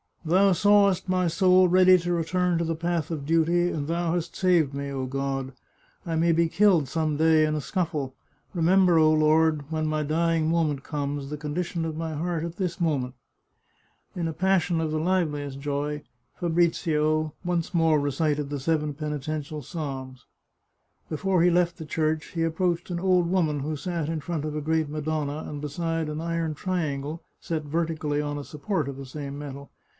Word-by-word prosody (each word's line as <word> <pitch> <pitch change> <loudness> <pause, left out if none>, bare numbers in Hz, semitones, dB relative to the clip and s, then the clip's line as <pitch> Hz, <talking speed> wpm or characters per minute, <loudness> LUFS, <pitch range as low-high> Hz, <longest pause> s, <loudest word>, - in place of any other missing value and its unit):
" - - -35
Thou 190 +5 +4
sawest 200 0 +3
my 185 -1 +2
soul 185 +2 +4
ready 185 +1 +6
to 175 0 -2
return 175 +1 +1
to - - +1
the 165 0 -1
path 170 -1 -1
of 155 -4 -4
duty, 165 +3 +2
and 145 -2 -3
Thou 170 0 0
hast 175 -1 -3
saved 175 -7 +2
me. 140 0 -4
O 135 -1 -3
God, 135 0 -3 0.5
I 165 -2 -2
may 165 +1 +3
be 165 0 +3
killed 180 -5 +3
some 155 +1 -1
day 160 0 +4
in 155 0 +1
a 150 - -2
scuffle. 150 -6 -2 0.4
Remember, 180 0 +4
O 155 0 +5
Lord, 155 -1 +3
when 155 -1 -1
my 155 0 0
dying 165 +1 +1
moment 155 -5 0
comes, 145 -2 -3
the 150 - -4
condition 165 +3 -3
of 160 -1 -4
my 160 -1 -3
heart 165 +1 -2
at 170 0 -5
this 185 -2 -2
moment." 135 -6 0 1.0
In 170 -2 -1
a 160 - -3
passion 185 -2 +1
of 160 -1 -1
the 155 - 0
liveliest 150 -6 -1
joy, 145 +1 -3 0.4
Fabrizio 155 -2 +1
once 175 -1 -1
more 165 -3 +3
recited 145 0 0
the 145 - -2
seven 150 +1 0
penitential 150 0 -4
psalms. 130 -4 -6 0.8
Before 180 +3 +1
he 175 - +5
left 175 0 +2
the 160 - -7
church, 155 0 -1
he 165 -2 -1
approached 170 +2 0
an 170 - -2
old 180 -1 +3
woman 160 -6 +1
who 155 +3 -2
sat 170 0 -3
in 160 0 -2
front 155 -1 -3
of 150 -1 -4
a 150 - -2
great 160 0 0
Madonna 150 0 -3
and 145 -1 -6
beside 165 +2 -2
an 150 +1 -4
iron 165 -1 -1
triangle 155 -2 -3 0.2
set 160 -2 -3
vertically 155 -1 -1
on 145 0 -3
a 145 - -5
support 150 +1 -3
of 140 -1 -5
the 135 - -7
same 140 +1 -6
metal. 140 -1 -8
160 Hz, 185 wpm, -26 LUFS, 150-170 Hz, 1.0 s, ready